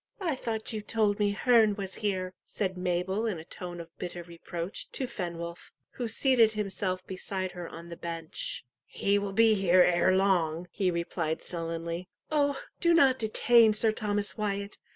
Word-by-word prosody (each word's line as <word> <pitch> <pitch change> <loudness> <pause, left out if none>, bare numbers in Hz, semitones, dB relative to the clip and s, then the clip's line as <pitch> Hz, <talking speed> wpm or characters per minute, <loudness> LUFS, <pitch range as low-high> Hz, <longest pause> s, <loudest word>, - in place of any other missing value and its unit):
"I 350 -6 0
thought 230 -4 -3
you 215 - -3
told 215 -1 +1
me 205 -1 +3
Herne 220 0 +4
was 195 -2 -5
here," 185 -3 -1
said 190 -2 -2
Mabel 180 +4 -1
in 205 -6 -2
a 160 - -8
tone 175 0 -6
of 165 0 -10
bitter 175 -1 -5
reproach, 170 +2 -6
to 265 - -1
Fenwolf, 170 -7 -6 0.2
who 245 - -4
seated 230 -1 +4
himself 195 -3 -2
beside 185 0 -3
her 175 -2 -7
on 170 +1 -10
the 170 - -6
bench. 165 -5 -5 0.2
"He 200 0 +1
will 200 -1 -3
be 225 +2 +5
here 185 -3 +5
ere 180 +2 +3
long," 175 -3 +1
he 190 -3 0
replied 170 -2 -2
sullenly. 165 +1 -4 0.2
"Oh, 285 -2 +2 0.2
do 340 -1 +4
not 265 -5 +5
detain 225 0 +5
Sir 220 +1 +3
Thomas 205 -2 0
Wyat!" 200 -1 -3
195 Hz, 170 wpm, -29 LUFS, 175-220 Hz, 0.2 s, be